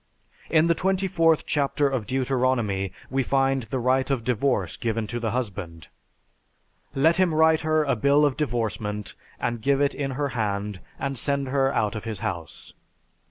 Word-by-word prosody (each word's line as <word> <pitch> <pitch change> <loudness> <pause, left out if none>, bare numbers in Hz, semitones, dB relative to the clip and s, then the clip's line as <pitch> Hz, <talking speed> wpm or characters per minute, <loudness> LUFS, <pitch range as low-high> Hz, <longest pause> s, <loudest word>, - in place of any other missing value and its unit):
In 160 -1 +4
the 170 - +4
24th 185 -3 +2
chapter 145 0 +1
of 130 -6 -2
Deuteronomy 125 -7 0 0.2
we 135 0 +1
find 135 +1 +1
the 115 +3 -4
right 130 +2 +1
of 135 -4 0
divorce 120 - 0
given 115 -1 -2
to 120 +3 -4
the 115 -1 -1
husband. 100 -9 -4 1.1
"Let 160 +5 +4
him 180 -4 +2
write 160 0 +4
her 155 0 +2
a 140 -3 +1
bill 140 +6 +4
of 140 -3 +1
divorcement 110 -6 -2 0.3
and 120 -1 -2
give 140 +3 +2
it 145 0 +2
in 140 -2 -3
her 145 -1 0
hand 105 -4 -2 0.2
and 135 -2 -3
send 140 0 0
her 135 0 +2
out 105 -6 0
of 110 0 -6
his 110 -3 -5
house." 85 -7 -6
130 Hz, 165 wpm, -25 LUFS, 110-145 Hz, 1.1 s, In